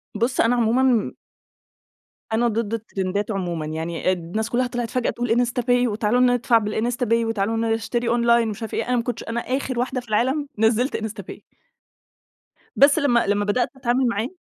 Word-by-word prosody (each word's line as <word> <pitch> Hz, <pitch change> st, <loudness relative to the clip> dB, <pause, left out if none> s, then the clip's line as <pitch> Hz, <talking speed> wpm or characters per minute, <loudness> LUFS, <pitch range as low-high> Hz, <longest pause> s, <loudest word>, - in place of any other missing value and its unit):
بُص 235 Hz, +4 st, +1 dB
أنا 235 Hz, +2 st, +3 dB
عمومًا 240 Hz, 0 st, +2 dB, 1.2 s
أنا 235 Hz, +2 st, +2 dB
ضد 225 Hz, -1 st, -2 dB
الترندات 205 Hz, -1 st, -3 dB
عمومًا، 175 Hz, -5 st, -3 dB
يعني 165 Hz, +3 st, -2 dB
أد 185 Hz, -, -1 dB
الناس 180 Hz, +7 st, -4 dB
كلّها 250 Hz, +1 st, +1 dB
طلعت 240 Hz, -1 st, -3 dB
فجأة 250 Hz, -2 st, -1 dB
تقول 245 Hz, 0 st, -3 dB
إنستا 245 Hz, +1 st, +1 dB
باي، 245 Hz, 0 st, +2 dB
وتعالوا 215 Hz, +2 st, 0 dB
ندفع 245 Hz, -1 st, +3 dB
بالإنستا 225 Hz, +3 st, -1 dB
باي، 230 Hz, 0 st, +2 dB
وتعالوا 225 Hz, 0 st, -1 dB
نشتري 225 Hz, +1 st, -1 dB
أونلاين 235 Hz, -1 st, +3 dB
ومش 215 Hz, +1 st, -5 dB
عارف 225 Hz, -, -6 dB
إيه، -, -, -2 dB
أنا 250 Hz, -, +1 dB
ما 235 Hz, -, 0 dB
كنتش 240 Hz, -2 st, -4 dB
أنا 230 Hz, +1 st, -3 dB
آخر 255 Hz, -1 st, -2 dB
واحدة 255 Hz, +1 st, -1 dB
في 240 Hz, -, -19 dB
العالم 265 Hz, +7 st, +1 dB
نزلت 225 Hz, +4 st, +2 dB
إنستا 220 Hz, -1 st, -5 dB
باي. -, -, -11 dB, 1.3 s
بس 280 Hz, +1 st, +5 dB
لما 240 Hz, -6 st, +2 dB
لما 205 Hz, 0 st, +1 dB
بدأت 235 Hz, +4 st, +1 dB
أتعامل 255 Hz, 0 st, +1 dB
معاه. 230 Hz, 0 st, -1 dB
235 Hz, 180 wpm, -22 LUFS, 215-245 Hz, 1.3 s, بس